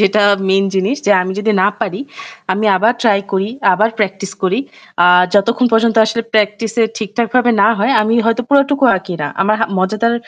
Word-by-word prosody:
যেটা 210 +1 +2 0.3
main 195 +1 +2
জিনিস 195 +8 -1
যে - - +2
আমি 185 +1 -4
যদি 215 +1 -1
না 190 - +3
পারি 190 -5 -3 0.5
আমি 210 +3 -2
আবার 215 +5 +2
try 215 -4 +3
করি 195 0 0 0.3
আবার 210 +5 +1
practice 195 -2 -3
করি। 190 +3 0 0.4
আ - - +5 0.3
যতক্ষণ 230 +5 +2
পর্যন্ত 225 0 +2
আসলে 230 +1 -2
practice 210 +1 0
এ - - +4
ঠিকঠাক 220 +2 -3
ভাবে 245 -1 +3
না - - +5
হয় 225 +6 0
আমি 220 +2 0
হয়তো 230 +2 0
পুরাটুকু 280 0 +2
আঁকি 185 -1 -7
না। - - -2
আমার 205 +2 +2
হা 225 - +1
মজাদার 215 +5 0
210 Hz, 195 wpm, -15 LUFS, 195-230 Hz, 0.5 s, আ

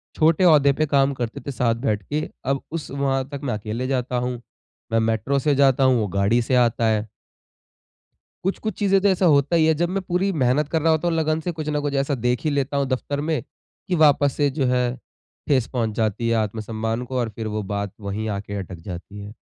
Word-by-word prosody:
छोटे 165 +3 +3
ओहदे 145 -4 +6
पे 155 +3 0
काम 140 -1 +2
करते 120 -3 -4
थे 140 - -5
साथ 120 -3 +1
बैठ 110 -4 -1
के, 150 +8 -3 0.2
अब 135 +1 0
उस 165 -1 -5
वहाँ 135 -1 -1
तक 140 -1 -6
मैं 130 - -1
अकेले 110 +4 -3
जाता 125 -2 -1
हूँ। 125 -1 -2 0.5
मैं 115 - +3
मेट्रो 115 +5 0
से 145 +1 +1
जाता 135 -1 +4
हूँ 130 -2 +4
वो 105 - 0
गाड़ी 100 +5 +2
से 125 +2 0
आता 120 -2 +2
है। 110 0 0 1.4
कुछ-कुछ 195 +2 -2
चीज़ें 195 -2 +3
तो 200 - +3
ऐसा 190 -1 +2
होता 145 0 +4
ही 160 -1 +4
है। 160 - +4
जब 170 +3 0
मैं 195 +2 -2
पूरी 185 +2 0
मेहनत 135 +4 +2
कर 160 0 0
रहा 165 +1 +4
होता 160 +2 +1
हूँ 170 - 0
लगन 155 0 +1
से, 175 +2 -3
कुछ 155 -2 -5
न 150 -1 0
कुछ 145 -1 -2
ऐसा 140 +1 +1
देख 125 -1 -1
ही 155 - +1
लेता 140 0 -1
हूँ 140 -1 +1
दफ्तर 140 +2 -2
में, 155 0 -1 0.5
कि 185 - +1
वापस 145 -3 +4
से 145 -1 +2
जो 135 -1 -1
है, 125 0 +1 0.5
ठेस 130 -6 +3
पहुँच 115 -4 -1
जाती 110 +1 0
है 115 - +2
आत्मसम्मान 110 +2 -2
को 130 +1 -3
और 120 - -1
फिर 110 - -4
वो 105 0 -2
बात 100 -1 -3
वही 100 +2 -4
आके 100 0 -7
अटक 95 -2 -7
जाती 95 +2 -8
है। 100 +1 -8
135 Hz, 230 wpm, -23 LUFS, 115-150 Hz, 1.4 s, ओहदे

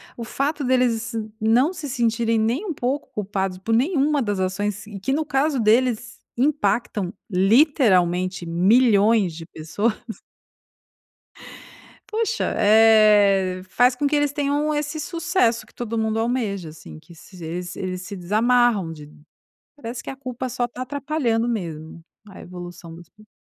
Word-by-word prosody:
O 235 - -6
fato 285 +6 -2
deles 245 -2 +1 0.3
nã 225 +3 +4
não 325 +6 -1
se 300 -6 -7
sentirem 230 -2 0
nem 230 - 0
um 360 - -3
pouco 270 +2 -3
culpados, 195 -2 -3
por 210 +5 -3
nenhuma 290 +2 +1
das 205 -5 -2
ações, 200 +2 -2
e 205 -2 -9
que 215 +8 -2
no 310 +3 0
caso 280 0 0
deles 230 +1 +1 0.2
impactam, 240 - 0 0.2
literalmente, 185 - +2
milhões 205 +2 +3
de 165 +1 -9
pessoas. 175 +9 -2 2.2
Poxa, 455 +2 -1
eh, 205 -3 +5
faz 245 +5 +3
com 285 - -2
que 295 - 0
eles 290 -1 +1
tenham 290 +1 0
esse 295 +1 -3
sucesso 330 -8 0
que - - -24
todo 230 -1 -4
mundo 220 0 0
almeja, 225 -7 -2
assim, 80 - -12
que 170 - -17
se 175 +1 -14
eles 175 +2 -5
eles 185 -1 -4
se 200 - -7
desamarram 215 0 +2
de 150 -2 -11 0.7
parece 235 -3 -7
que - - -7
a 270 - -8
culpa 255 -1 -5
só 245 0 -2
tá 245 +1 -8
atrapalhando 265 -4 -1
mesmo 165 -7 -5 0.2
a 195 - -12
evolução 175 -2 -10
do 170 - -12
espírito. 215 +5 -19
225 Hz, 150 wpm, -22 LUFS, 190-260 Hz, 2.2 s, eh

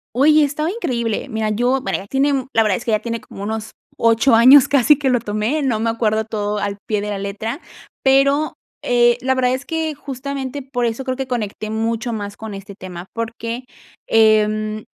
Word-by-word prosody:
Oye, 300 +4 +5
estaba 305 +3 -1
increíble. 245 - -2
Mira, 220 -3 -2
yo, 245 +5 +1
bueno, 195 - -1
ya 195 - -9
tiene 275 +5 +1
un, 265 -2 -2
la 225 - +5
verdad 210 -4 +1
es - - -10
que 230 - -1
ya 215 - +2
tiene 230 0 -4
como 195 - -11
unos 220 +1 -4 0.3
8 230 +2 +4
años 255 +4 +8
casi 285 +1 +5
que 275 -3 +1
lo 245 -1 +2
tomé, 215 +8 -1
no 240 -6 0
me 230 +1 +1
acuerdo 220 -1 0
todo 210 -1 -3
al 200 0 -3
pie 210 -2 0
de 210 +1 -4
la 205 - -3
letra, 210 - -4 0.4
pero, 275 +3 +3 0.3
eh, 240 0 +3
la 260 +1 +1
verdad 255 -1 +1
es 260 - -5
que, 320 -2 -2
justamente, 275 0 -5
por 250 -2 -2
eso 230 +3 -3
creo 260 -1 -2
que 265 0 -3
conecté 215 -3 -3
mucho 225 +2 -2
más 205 -2 -5
con 220 -2 -7
este 195 +1 -9
tema, 185 -2 -9
porque, 230 +2 -5 0.4
em, 215 -1 +2
230 Hz, 205 wpm, -19 LUFS, 215-265 Hz, 0.4 s, años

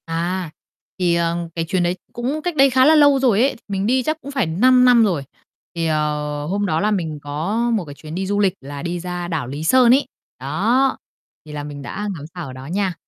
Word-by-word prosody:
À, 170 +2 -2 0.5
thì, 175 -2 +2
ờ, 170 0 0 0.2
cái 165 -1 -1
chuyến 180 +2 0
đấy 175 +1 0 0.2
cũng 260 +6 -3
cách 350 0 -3
đây 275 -1 +5
khá 260 0 +4
là 315 +2 +6
lâu 285 -2 +5
rồi 235 -5 +3
ấy, 270 +2 +2
mình 195 -1 -2
đi 255 +2 +2
chắc 310 +4 -1
cũng 280 - -8
phải 270 -6 0
5 250 +10 +4
năm 245 -2 +6
rồi. 175 -10 0 0.5
Thì, 165 -1 -1
ờ, 150 -1 -1
hôm 200 +6 -1
đó 160 -5 0
là 210 +3 +1
mình 160 -7 -2
có 155 +10 -3
một 210 -6 -1
cái 145 - -9
chuyến 155 +2 -9
đi 190 +1 -2
du 205 +1 0
lịch 195 -3 +3
là 140 +2 -8
đi 175 0 -3
ra 180 0 -5
đảo 160 -7 -3
Lý 145 +4 -5
Sơn 245 +7 +5
ấy. 275 - +3 0.3
Đó, 260 +3 +1 0.5
thì 155 - -11
là 145 -1 -5
mình 145 -1 -8
đã 210 +9 -5
ngắm 145 -3 -8
sao 175 -4 -6
ở 130 - -8
đó 130 +1 -10
nha. 190 +4 -1
180 Hz, 240 wpm, -20 LUFS, 155-245 Hz, 0.5 s, là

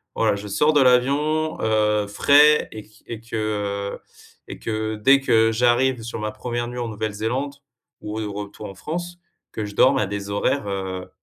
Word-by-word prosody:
voilà - - +2
je 100 +1 -7
sors 150 +9 +2
de 145 - +4
l'avion, 145 +5 +2
heu, 105 -1 +2
frais 145 +8 +5
et 110 - -8
q 110 +1 -23
et 115 -2 -7
que, 115 0 -8 0.6
heu - - -14 0.5
et - - -8
que 110 0 -3
dès 135 +6 +5
que 115 -4 +3
j'arrive 125 +1 +2
sur 115 0 -6
ma 105 0 -3
1re 120 +2 -4
nuit 125 0 -6
en 120 - -3
Nouvelle-Zélande 110 +6 -3 0.5
ou 105 +1 -5
au 105 -2 -4
retour 105 +1 -7
en 95 - -10
France 175 - -6 0.3
que 110 - -4
je 105 - -8
dorme 135 +3 +4
à 105 - +1
des 100 0 -5
horaires, 100 +3 -1
heu, 95 -2 -4
110 Hz, 185 wpm, -22 LUFS, 105-135 Hz, 0.6 s, frais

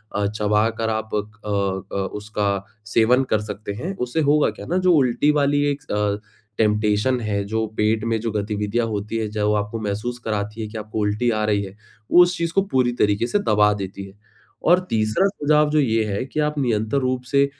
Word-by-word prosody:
अ, 100 0 +1
चबाकर 105 +2 0
आप 110 0 -2
अ 105 - +2 0.8
अ, - - 0 0.2
उसका 105 -1 -2 0.4
सेवन 125 +4 +4
कर 110 - +2
सकते 105 -1 -6
हैं। 170 - -5
उससे 125 +6 -1
होगा 150 0 +3
क्या - - -9
ना 175 - -1
जो 180 - +6
उल्टी 130 +2 +3
वाली 145 0 +2
एक 145 +1 -7
अ, 105 0 0 0.4
टेम्पटेशन 105 +3 +2
है, 105 -2 -1
जो 110 +2 -1
पेट 110 0 +1
में 115 -1 0
जो 115 0 -2
गतिविधियाँ 105 +2 -1
होती 105 +1 -3
हैं, 110 -1 -2
चाहे 105 -1 -1
वो 105 - +3
आपको 105 +2 -2
महसूस 105 +4 -3
कराती 105 +1 -3
हैं 110 - -4
कि 110 - -6
आपको 110 0 -5
उल्टी 105 +4 +1
आ 110 -1 0
रही 105 -1 +1
है, 95 0 -9 0.4
वो 175 - +8
उस 180 +1 -1
चीज़ 170 0 -2
को 195 - +4
पूरी 125 -2 +3
तरीके 105 +3 +2
से 205 - +1
दबा 105 0 +5
देती 100 -1 -6
है। 95 +1 -17 0.5
और 180 +1 +6
तीसरा 110 - +1
सुझाव 150 -5 +2
जो 155 - +3
ये 115 -5 +2
है 100 +2 -2
कि 135 +3 -5
आप 150 0 -1
निरंतर 115 0 0
रूप 130 -1 -1
से 140 -1 +5
110 Hz, 210 wpm, -22 LUFS, 105-130 Hz, 0.8 s, वो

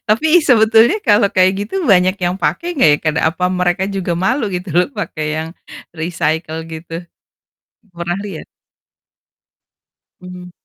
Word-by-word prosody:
Tapi 225 +9 +2 0.2
sebetulnya 225 - +4
kalau 205 -1 +4
kayak 185 -1 +3
gitu - - -11
banyak 185 -2 +3
yang 175 +1 0
pakai 345 - -1
nggak 155 - +5
ya 150 - +2
kana 155 0 0
apa 180 +2 -4
mereka 180 0 0
juga 190 -3 -3
malu 255 +6 +1
gitu 180 +2 -5
loh 180 +5 +3
pakai 165 -7 -4
yang 160 - -4 0.5
recycle 160 -1 -2
gitu. 165 0 -9 1.0
Pernah 175 +1 -3
lihat? 190 -6 -7 1.8
Mmm. 180 0 -10
180 Hz, 135 wpm, -16 LUFS, 165-205 Hz, 1.8 s, nggak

